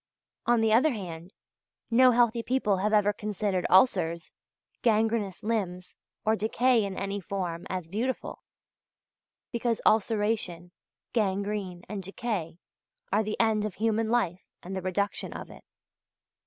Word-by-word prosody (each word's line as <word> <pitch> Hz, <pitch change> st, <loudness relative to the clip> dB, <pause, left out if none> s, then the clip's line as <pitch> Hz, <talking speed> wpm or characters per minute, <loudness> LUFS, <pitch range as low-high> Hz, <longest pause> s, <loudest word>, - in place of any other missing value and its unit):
On 240 Hz, -1 st, +4 dB
the 220 Hz, -1 st, +3 dB
other 260 Hz, +8 st, +5 dB
hand, 180 Hz, -, -6 dB, 0.6 s
no 255 Hz, +2 st, +7 dB
healthy 235 Hz, -1 st, +3 dB
people 230 Hz, -5 st, +1 dB
have 205 Hz, +3 st, 0 dB
ever 210 Hz, -1 st, +4 dB
considered 205 Hz, -3 st, -2 dB
ulcers, 175 Hz, -4 st, +3 dB, 0.5 s
gangrenous 220 Hz, -4 st, +1 dB
limbs, 190 Hz, -5 st, -2 dB, 0.3 s
or 220 Hz, +1 st, +3 dB
decay 230 Hz, +2 st, +2 dB
in 195 Hz, -1 st, -4 dB
any 195 Hz, +1 st, -2 dB
form, 175 Hz, -2 st, -4 dB
as 185 Hz, -3 st, -3 dB
beautiful; 230 Hz, +9 st, -3 dB, 1.1 s
because 235 Hz, -2 st, 0 dB
ulceration, 210 Hz, -5 st, +1 dB, 0.4 s
gangrene, 200 Hz, -4 st, -1 dB
and 205 Hz, 0 st, -4 dB
decay, 190 Hz, -3 st, -4 dB, 0.6 s
are 210 Hz, -, +4 dB
the 215 Hz, 0 st, -3 dB
end 220 Hz, -2 st, +3 dB
of 210 Hz, -4 st, -3 dB
human 225 Hz, 0 st, 0 dB
life 195 Hz, -7 st, +1 dB, 0.2 s
and 190 Hz, +2 st, -6 dB
the 190 Hz, -, -2 dB
reduction 195 Hz, +2 st, -2 dB
of -, -, -8 dB
it. -, -, -14 dB
210 Hz, 130 wpm, -28 LUFS, 185-225 Hz, 1.1 s, no